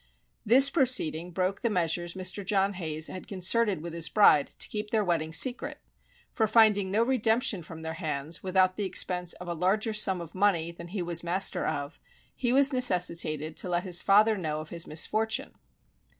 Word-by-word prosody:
This 260 Hz, +5 st, +6 dB
proceeding 205 Hz, -, 0 dB
broke 185 Hz, +2 st, -3 dB
the 235 Hz, -, 0 dB
measures 175 Hz, -2 st, -2 dB
Mr. 185 Hz, +2 st, -3 dB
John 195 Hz, +1 st, 0 dB
Hayes 160 Hz, -4 st, -4 dB
had 185 Hz, -, -6 dB
concerted 195 Hz, -1 st, 0 dB
with 170 Hz, -1 st, -7 dB
his 165 Hz, -1 st, +3 dB
bride, 150 Hz, -9 st, +4 dB
to -, -, -2 dB
keep 210 Hz, 0 st, -6 dB
their 215 Hz, -1 st, 0 dB
wedding 165 Hz, -4 st, -2 dB
secret; 245 Hz, +9 st, +1 dB, 0.5 s
for 220 Hz, -, 0 dB
finding 215 Hz, -3 st, +3 dB
no 215 Hz, +4 st, +1 dB
redemption 235 Hz, -4 st, 0 dB
from 160 Hz, 0 st, -11 dB
their 160 Hz, 0 st, -5 dB
hands, 155 Hz, -2 st, -5 dB
without 185 Hz, 0 st, +1 dB
the 210 Hz, -, -3 dB
expense 180 Hz, -2 st, +1 dB
of 180 Hz, -, -11 dB
a 170 Hz, -, -3 dB
larger 195 Hz, +6 st, -1 dB
sum 195 Hz, -3 st, +2 dB
of 170 Hz, -1 st, -10 dB
money 185 Hz, -4 st, 0 dB
than 170 Hz, 0 st, -11 dB
he 185 Hz, +1 st, -5 dB
was 170 Hz, -1 st, -3 dB
master 185 Hz, +3 st, 0 dB
of, 145 Hz, +2 st, -5 dB, 0.4 s
he 245 Hz, -2 st, -2 dB
was 275 Hz, +2 st, +4 dB
necessitated 170 Hz, -, +1 dB
to 180 Hz, -, -1 dB
let 175 Hz, 0 st, -1 dB
his 180 Hz, -2 st, +3 dB
father 215 Hz, +2 st, +3 dB
know 155 Hz, -5 st, -4 dB
of 155 Hz, 0 st, -9 dB
his 170 Hz, -1 st, -5 dB
misfortune. 215 Hz, +8 st, 0 dB
185 Hz, 185 wpm, -27 LUFS, 170-215 Hz, 0.5 s, This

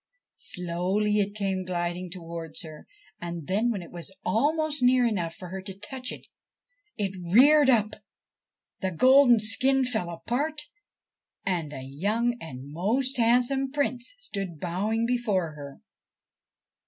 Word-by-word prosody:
Slowly 185 Hz, +4 st, 0 dB
it 205 Hz, 0 st, -1 dB
came 195 Hz, -3 st, -1 dB
gliding 175 Hz, 0 st, -3 dB
towards 165 Hz, -2 st, -6 dB
her, 155 Hz, -2 st, -11 dB, 0.3 s
and 170 Hz, -2 st, -5 dB
then, 210 Hz, +8 st, +1 dB
when 200 Hz, -6 st, -2 dB
it 170 Hz, -, -13 dB
was 175 Hz, +2 st, -7 dB
almost 300 Hz, +5 st, +1 dB
near 250 Hz, 0 st, +5 dB
enough 175 Hz, -8 st, -1 dB
for 180 Hz, -, -9 dB
her 190 Hz, +1 st, -5 dB
to 190 Hz, 0 st, -8 dB
touch 255 Hz, +5 st, -3 dB
it, -, -, -9 dB, 0.7 s
it 195 Hz, -3 st, -2 dB, 0.2 s
reared 285 Hz, +6 st, +7 dB
up 215 Hz, -4 st, +3 dB, 0.9 s
the 190 Hz, -, -1 dB
golden 255 Hz, -, +6 dB
skin 260 Hz, +5 st, +3 dB
fell 220 Hz, -8 st, -2 dB
apart, 285 Hz, -, -2 dB, 0.8 s
and 170 Hz, -6 st, -1 dB
a 135 Hz, -3 st, -7 dB
young 210 Hz, -, -1 dB
and 135 Hz, -3 st, -9 dB
most 240 Hz, -, 0 dB
handsome 250 Hz, +3 st, +2 dB
Prince 255 Hz, -, -1 dB
stood 195 Hz, -, -5 dB
bowing 205 Hz, +7 st, -1 dB
before 215 Hz, -9 st, 0 dB
her. 145 Hz, -2 st, -10 dB
205 Hz, 135 wpm, -27 LUFS, 175-245 Hz, 0.9 s, reared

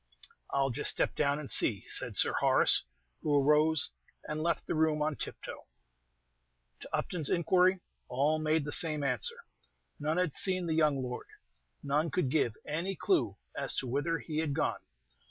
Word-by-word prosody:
"I 140 Hz, -, -1 dB
'll 135 Hz, -, -1 dB
just -, -, -2 dB
step -, -, -1 dB
down 140 Hz, -1 st, 0 dB
and 150 Hz, -2 st, -5 dB
see," 100 Hz, -5 st, +4 dB
said -, -, -1 dB
Sir -, -, +5 dB
Horace, -, -, +4 dB, 0.4 s
who 150 Hz, -, 0 dB
arose, 150 Hz, +2 st, +3 dB, 0.4 s
and 155 Hz, 0 st, -4 dB
left 170 Hz, +1 st, -1 dB
the -, -, -3 dB
room 155 Hz, -1 st, +1 dB
on 150 Hz, 0 st, -1 dB
tiptoe. -, -, -8 dB, 1.1 s
To -, -, -11 dB
Upton's 165 Hz, -6 st, -2 dB
inquiry 180 Hz, +2 st, +2 dB, 0.3 s
all 145 Hz, +5 st, 0 dB
made 155 Hz, -1 st, 0 dB
the 145 Hz, -, -4 dB
same 155 Hz, -2 st, +3 dB
answer. 125 Hz, -6 st, 0 dB, 0.6 s
None 155 Hz, +3 st, -1 dB
had 180 Hz, -5 st, 0 dB
seen 185 Hz, -2 st, +2 dB
the 165 Hz, -, -1 dB
young 150 Hz, -4 st, +1 dB
lord, 125 Hz, 0 st, -6 dB, 0.6 s
none 150 Hz, +3 st, 0 dB
could 140 Hz, -3 st, -1 dB
give 125 Hz, -8 st, 0 dB
any 170 Hz, +6 st, -3 dB
clew 370 Hz, -, 0 dB, 0.2 s
as -, -, +1 dB
to -, -, -2 dB
whither 145 Hz, +7 st, -1 dB
he 155 Hz, -2 st, -5 dB
had 150 Hz, -3 st, -2 dB
gone. 155 Hz, -, -1 dB
155 Hz, 170 wpm, -30 LUFS, 140-165 Hz, 1.1 s, Sir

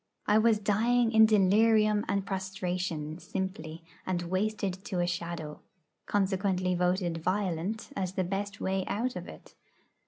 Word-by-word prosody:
I 210 Hz, +1 st, +4 dB
was 225 Hz, -1 st, +4 dB
dying 225 Hz, +3 st, +2 dB
in 220 Hz, -1 st, +7 dB
delirium 215 Hz, +1 st, +4 dB
and 200 Hz, -1 st, 0 dB
prostration, 180 Hz, -5 st, -3 dB
simply, 175 Hz, -4 st, -5 dB, 0.2 s
and 180 Hz, -2 st, -2 dB
wasted 190 Hz, +1 st, -2 dB
to 185 Hz, -4 st, -2 dB
a 175 Hz, -, +2 dB
shadow; 170 Hz, -3 st, -4 dB, 0.5 s
consequently 190 Hz, -2 st, +1 dB
voted 180 Hz, -1 st, 0 dB
'violent,' 185 Hz, +3 st, -2 dB
as 185 Hz, -2 st, -2 dB
the 190 Hz, -, 0 dB
best 200 Hz, +2 st, -3 dB
way 190 Hz, 0 st, -1 dB
out 245 Hz, +5 st, -1 dB
of -, -, -6 dB
it. -, -, -13 dB
190 Hz, 135 wpm, -29 LUFS, 180-210 Hz, 0.5 s, in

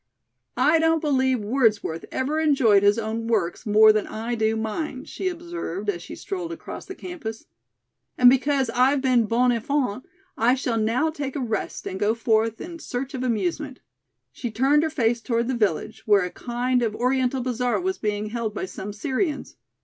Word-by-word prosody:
"I 320 Hz, +1 st, +4 dB
don't 325 Hz, 0 st, +3 dB
believe 260 Hz, -5 st, +1 dB
Wordsworth 210 Hz, -7 st, +1 dB
ever 285 Hz, +4 st, -1 dB
enjoyed 270 Hz, -10 st, +4 dB
his 205 Hz, +2 st, +4 dB
own 225 Hz, 0 st, -3 dB
works 225 Hz, -1 st, -1 dB
more 215 Hz, +1 st, +7 dB
than 215 Hz, -1 st, -1 dB
I 225 Hz, +2 st, -4 dB
do 220 Hz, -1 st, +1 dB
mine," 255 Hz, +5 st, -4 dB
she 380 Hz, -, -4 dB
observed, 340 Hz, -, -4 dB
as 175 Hz, -3 st, -8 dB
she -, -, -9 dB
strolled 360 Hz, -4 st, -5 dB
across 335 Hz, -, -8 dB
the 380 Hz, -, -7 dB
campus. 300 Hz, -12 st, -7 dB, 0.7 s
"And 250 Hz, -, +6 dB
because 265 Hz, 0 st, +3 dB
I've 255 Hz, +4 st, +3 dB
been 250 Hz, -4 st, +3 dB
bon 245 Hz, +3 st, +3 dB
enfant, 250 Hz, 0 st, -1 dB, 0.3 s
I 240 Hz, +3 st, +3 dB
shall 245 Hz, -4 st, -1 dB
now 240 Hz, +9 st, +1 dB
take 285 Hz, -3 st, -5 dB
a -, -, -2 dB
rest 225 Hz, -5 st, -3 dB
and 190 Hz, -, -5 dB
go 210 Hz, +2 st, +2 dB
forth 225 Hz, -1 st, +1 dB
in 340 Hz, -1 st, -8 dB
search 265 Hz, +2 st, -5 dB
of 260 Hz, -, -4 dB
amusement." 250 Hz, -, -2 dB, 0.5 s
She 240 Hz, -, -5 dB
turned 270 Hz, +7 st, +3 dB
her 320 Hz, -, 0 dB
face 235 Hz, -5 st, 0 dB
toward 235 Hz, -1 st, 0 dB
the 260 Hz, -, 0 dB
village, 220 Hz, +1 st, -1 dB
where 205 Hz, -3 st, +5 dB
a 180 Hz, -, -4 dB
kind 245 Hz, +1 st, -1 dB
of 220 Hz, -3 st, -1 dB
Oriental 255 Hz, +1 st, 0 dB
bazaar 250 Hz, -1 st, 0 dB
was 375 Hz, +1 st, -2 dB
being 210 Hz, 0 st, -2 dB
held 230 Hz, -3 st, -3 dB
by -, -, -2 dB
some 195 Hz, +2 st, -7 dB
Syrians. 285 Hz, -, -2 dB
245 Hz, 180 wpm, -24 LUFS, 220-275 Hz, 0.7 s, more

